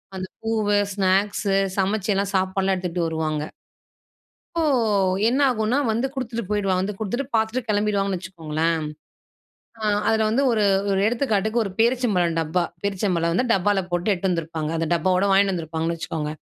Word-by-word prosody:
அந்த 185 0 -4 0.2
பூவு, 215 -2 +1 0.2
ஸ்நாக்ஸு 195 +1 +1 0.2
சமைச்சு 200 +2 0
எல்லாம் 200 +1 -1
சாப்பாடுலாம் 190 0 +1
எடுத்துட்டு 180 -2 -2
வருவாங்க. 155 -2 -2 1.1
அப்போ, 330 - +1 0.6
என்ன 255 +4 +1
ஆகுனா, 220 +2 0
வந்து 235 +4 0
குடுத்துட்டு 235 -3 -4
போயிடுவான், 195 -3 +1
வந்து 195 +3 -2
குடுத்துட்டு 230 +6 -2
பார்த்துட்டு 220 +3 +1
கெளம்பிடுவாங்கன்னு 205 -2 +1
வச்சுக்கோங்களேன். 165 -2 -2 1.1
ஆ - - -8 0.3
அதுல 220 -1 +2
வந்து, 250 +5 +2
ஒரு 220 -3 +2 0.3
ஒரு 195 -1 +1
எடுத்துக்காட்டுக்கு 225 -2 +1
ஒரு 200 - -3
பேரீச்சம்பழம் 225 -8 +2
டப்பா. 165 +3 0 0.2
பேரீச்சம்பழம் 185 -4 0
வந்து 250 +9 +1
டப்பால 195 +1 +2
போட்டு 175 +4 +1
எட்டு 190 +1 -2
வந்திருப்பாங்க. 165 -3 -2
அந்த 165 0 -1
டப்பாவோடு 185 +3 +2
வாங்கீட்டு 195 0 +4
வந்துருப்பாங்கனு 165 -1 -2
வச்சுக்கோங்க. 155 -2 -4
195 Hz, 140 wpm, -23 LUFS, 175-220 Hz, 1.1 s, வாங்கீட்டு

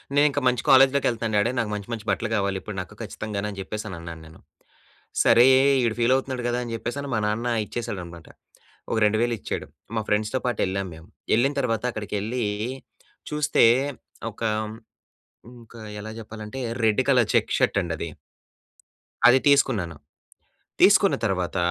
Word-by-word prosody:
నేనింక 145 -1 +4
మంచి 125 -1 +1
కాలేజ్‌లోకెళ్తన్నాను 130 -5 +4
డాడీ. 120 +4 +2
నాకు 110 - -1
మంచి 105 0 -5
మంచి 110 -2 -5
బట్టలు 105 +3 0
కావాలి. 100 -1 0
ఇప్పుడు 105 - -7
నాకు 90 - -7
ఖచ్చితంగాను 105 -1 -4
అని 100 - -8
చెప్పేసని 105 -1 -6
అన్నా 85 0 -7
నేను. 80 +1 -15 0.8
సరే 120 +2 +6 0.4
ఈడు 115 -2 0
ఫీలవుతున్నాడు 130 +1 +1
గదా 120 0 0
అని 115 -1 -6
చెప్పేసని 135 +5 -4
మా 110 - +1
నాన్న 110 +3 -1 0.2
ఇచ్చేసాడనమాట. 90 -9 -6 0.6
ఒక - - 0
2000 115 +3 +1
ఇచ్చాడు. - - -5 0.3
మా 110 - +1
ఫ్రెండ్స్‌తో 105 +4 0
పాటు 120 -3 -1
ఎళ్ళాము 95 0 -3
మేము. 80 +1 -14 0.3
ఎళ్ళిన 135 +5 +2
తర్వాత 115 -3 -1
అక్కడికెళ్ళీ 110 +3 -3 0.9
చూస్తే 150 -4 +3 0.7
ఒక 110 - -20 1.1
హ్మ్ 120 +1 -13
ఒక 115 - -17 0.2
ఎలా 110 +1 -7
జెప్పాలంటే 110 +1 -8 0.3
రెడ్ 110 +3 +3
కలర్ 125 -5 +4
చెక్స్ - - +2
షర్టండి 85 -4 +1
అది. 85 - -4 1.2
అది 130 +2 +7
తీసుకున్నాను. 100 - +2 0.9
తీసుకున్న - - +6
తర్వాత 90 -2 -1
110 Hz, 140 wpm, -24 LUFS, 100-125 Hz, 1.2 s, అది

